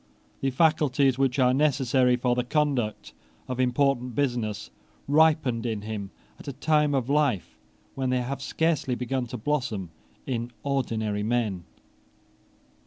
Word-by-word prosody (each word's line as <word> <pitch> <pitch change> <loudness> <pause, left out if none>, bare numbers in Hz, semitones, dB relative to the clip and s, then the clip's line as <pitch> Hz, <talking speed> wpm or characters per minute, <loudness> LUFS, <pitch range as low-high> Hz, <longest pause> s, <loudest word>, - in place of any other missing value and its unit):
The 135 - 0
faculties 140 -2 +2
which 135 -1 +1
are 125 -2 +4
necessary 130 -3 +3
for 125 0 +1
the 125 0 0
conduct 125 - -1 0.3
of 125 0 -4
important 125 -1 +1
business 115 -6 -2 0.4
ripened 145 -6 +3
in 110 -4 -3
him 105 -2 -5 0.3
at - - -13
a 140 - -4
time 150 +1 +2
of 130 -3 0
life 140 - 0 0.3
when 130 -1 -2
they 125 0 +1
have 135 +2 -4
scarcely 160 -5 0
begun 125 0 -2
to 125 - -6
blossom 110 - -2 0.3
in 120 -2 -3
ordinary 110 -7 -1
men. 105 -5 -1
125 Hz, 135 wpm, -26 LUFS, 115-140 Hz, 0.4 s, are